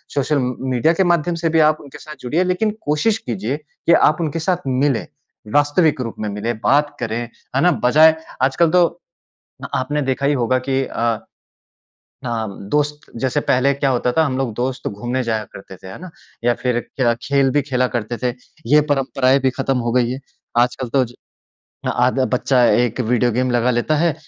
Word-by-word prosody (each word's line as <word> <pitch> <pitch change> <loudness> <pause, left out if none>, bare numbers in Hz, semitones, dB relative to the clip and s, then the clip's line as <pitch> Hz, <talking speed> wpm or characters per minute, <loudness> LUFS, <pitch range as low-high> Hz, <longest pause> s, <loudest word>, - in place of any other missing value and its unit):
Social 140 +1 +1
म 125 -1 -1 0.2
media 130 +7 +3
के 190 - +2
माध्यम 175 -1 +1
से - - +4
भी 160 0 +2
आप 155 - -9
उनके 140 - -12
साथ 155 0 -10
जुड़िए 155 +9 0
लेकिन 185 +4 0
कोशिश 150 +9 +1
कीजिए 120 - -3
कि 155 +2 -1
आप 155 -2 +4
उनके 160 0 -2
साथ 175 +2 0
मिलें। 130 -1 +1 0.5
वास्तविक 145 +1 +3
रूप 115 -3 -5
में 110 - -3
मिलें, 105 +3 -3
बात 145 +5 +2
करें, 115 -2 -2 0.4
है 135 - +3
ना। 180 +3 +5
बजाए 155 +5 +6 0.3
आजकल 140 +5 +3
तो 180 0 +5 0.8
अ, - - -3
आपने 145 +3 -1
देखा 135 +1 -1
ही 145 - +3
होगा 130 0 +1
कि 135 0 +1
अ, - - -10 1.3
हाँ, 115 -2 -2 0.2
दोस्त 150 +2 -1
जैसे 130 +2 +1
पहले 135 +2 +2
क्या 140 0 0
होता 125 -1 +1
था 160 - +3
हम 130 -3 -2
लोग 130 -4 -2
दोस्त 130 +2 -3
घूमने 120 +6 -3
जाया 110 -2 -1
करते 95 -1 -11
थे। 95 - -13
है 95 - -9
ना। 185 - -8 0.3
या 120 0 +3
फिर 125 -2 +1 0.2
क्या 120 -3 +3
खेल 140 0 +2
भी 145 - +2
खेला 125 -2 0
करते 120 +1 -2
थे, 125 -1 +1 0.3
ये 150 +1 +5
परंपराएँ 135 -1 +2
भी 130 - +3
खत्म 135 0 -1
हो - - +1
गई 125 -1 +2
हैं। 130 +2 -5 0.4
आजकल 125 0 -1
तो 130 +2 +2
ज 120 - -14 0.8
आधा 130 +2 +2
बच्चा 125 0 +2
एक 120 0 +2
वीडियो 120 +1 +1
गेम 125 +3 0
लगा 120 0 +2
लेता 125 +6 +1
है 165 0 +2
130 Hz, 195 wpm, -19 LUFS, 125-150 Hz, 1.3 s, बजाए